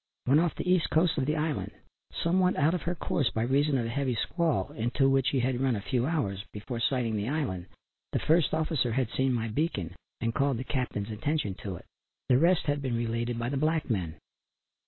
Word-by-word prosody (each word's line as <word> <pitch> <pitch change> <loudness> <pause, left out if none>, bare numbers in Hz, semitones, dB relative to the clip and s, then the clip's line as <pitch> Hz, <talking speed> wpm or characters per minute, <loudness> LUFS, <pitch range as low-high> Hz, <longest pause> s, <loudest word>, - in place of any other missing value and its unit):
When 140 +4 +5
off 170 0 +1
the - - -4
east 180 -2 +3
side 160 +1 +3
of 135 -3 -1
the 150 - +1
island 155 -1 -1 0.5
somewhat 180 +2 +3
out 150 +3 +3
of 180 - -1
her 175 +1 -2
course 140 -5 0
by 110 - -1
reason 140 +3 +2
of 120 - -1
a - - -2
heavy 130 0 -1
squall 155 - 0
into 120 +4 +1
which 135 -1 +3
she 135 - +2
had 125 0 0
run 130 -3 +2
a - - -2
few 120 +5 0
hours 100 - -1
before 115 +3 -5
sighting 120 -2 0
the 105 +4 -2
island, 130 - -2 0.4
the - - 0
first 160 0 +3
officer 155 -7 0
had 130 -2 0
seen 130 0 +1
my 115 -2 0
beacon 110 - -2 0.3
and 115 0 -1
called 140 -1 +1
the 125 - -3
Captain's 120 -6 -2
attention 110 0 -1
to 95 -3 -4
it. - - -11 0.4
The 125 0 +5
rest 170 +3 +4
had 145 -1 0
been 130 -3 -1
related 115 +1 -1
by 120 +1 -2
the 140 - -1
black 155 -1 +1
men. 85 -7 -2
130 Hz, 220 wpm, -29 LUFS, 115-155 Hz, 0.5 s, When